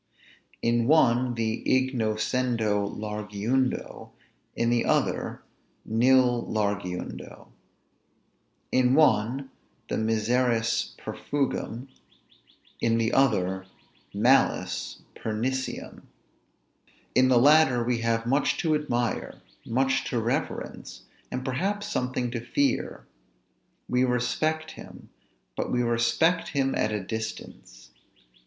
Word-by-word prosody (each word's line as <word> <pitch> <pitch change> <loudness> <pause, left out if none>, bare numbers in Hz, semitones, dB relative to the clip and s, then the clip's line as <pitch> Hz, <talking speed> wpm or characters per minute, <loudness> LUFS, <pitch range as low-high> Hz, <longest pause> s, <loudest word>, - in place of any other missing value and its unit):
In 115 0 +2
one 125 -5 +3
the 115 0 -2
ignoscendo 115 -4 0
largiundo; 105 +4 -2 0.5
in 115 0 +1
the 120 -1 +2
other, - - 0 0.4
nil 125 +1 +3
largiundo. 100 -4 -4 1.2
In 130 0 +3
one, 135 -2 +2 0.4
the - - -1
miseris 115 +1 +1
perfugium; 135 -3 -3 0.9
in 115 0 +2
the 115 0 0
other, 95 -8 +1 0.4
malis 120 +7 +1
perniciem. 125 +4 -3 1.1
In 130 0 +5
the 130 -1 +4
latter 135 -2 +5
we 120 0 0
have 115 0 0
much 135 +4 +1
to 160 -2 +1
admire, 120 -6 -2 0.3
much 135 +3 +1
to 120 - 0
reverence, 115 +2 -4 0.3
and 130 0 -4
perhaps 195 +11 -1
something 125 - -2
to 120 - -3
fear; 140 +4 -1 0.8
we 125 +1 +2
respect 155 +6 0
him, - - -12 0.5
but - - -3
we 125 0 +1
respect 120 +9 +2
him 135 -2 0
at 110 - 0
a 105 -2 -2
distance. 110 - -7
120 Hz, 95 wpm, -26 LUFS, 110-130 Hz, 1.2 s, In